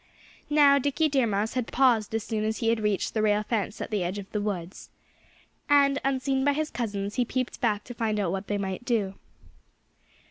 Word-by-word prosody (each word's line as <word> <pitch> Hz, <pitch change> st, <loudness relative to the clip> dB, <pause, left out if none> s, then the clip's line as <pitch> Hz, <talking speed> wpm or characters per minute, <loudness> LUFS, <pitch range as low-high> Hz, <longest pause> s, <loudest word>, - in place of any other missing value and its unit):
Now, 290 Hz, -2 st, +6 dB
Dickie 285 Hz, +3 st, +1 dB
Deer 265 Hz, -4 st, +2 dB
Mouse 210 Hz, +1 st, -1 dB
had 250 Hz, -3 st, -2 dB
paused 235 Hz, -5 st, +2 dB
as 225 Hz, -, -1 dB
soon 220 Hz, -2 st, -2 dB
as 220 Hz, +1 st, -1 dB
he 225 Hz, -, 0 dB
had 230 Hz, 0 st, +2 dB
reached 210 Hz, -2 st, -1 dB
the 220 Hz, -, 0 dB
rail 210 Hz, 0 st, +2 dB
fence 210 Hz, -1 st, -2 dB
at -, -, -5 dB
the 205 Hz, -4 st, 0 dB
edge 180 Hz, +3 st, -3 dB
of 200 Hz, -1 st, -8 dB
the 210 Hz, -, -1 dB
woods. 190 Hz, -3 st, -5 dB, 0.8 s
And 280 Hz, -1 st, +4 dB
unseen 265 Hz, 0 st, 0 dB
by 285 Hz, +1 st, +3 dB
his 310 Hz, +1 st, -2 dB
cousins 205 Hz, -4 st, -3 dB
he 250 Hz, -, +3 dB
peeped 255 Hz, +1 st, -3 dB
back 210 Hz, -3 st, +1 dB
to 245 Hz, -, -8 dB
find 220 Hz, -2 st, -1 dB
out 190 Hz, -4 st, 0 dB
what 195 Hz, +1 st, -4 dB
they 205 Hz, -, -1 dB
might 195 Hz, +2 st, -4 dB
do. 220 Hz, -6 st, 0 dB
225 Hz, 210 wpm, -27 LUFS, 205-260 Hz, 0.8 s, Now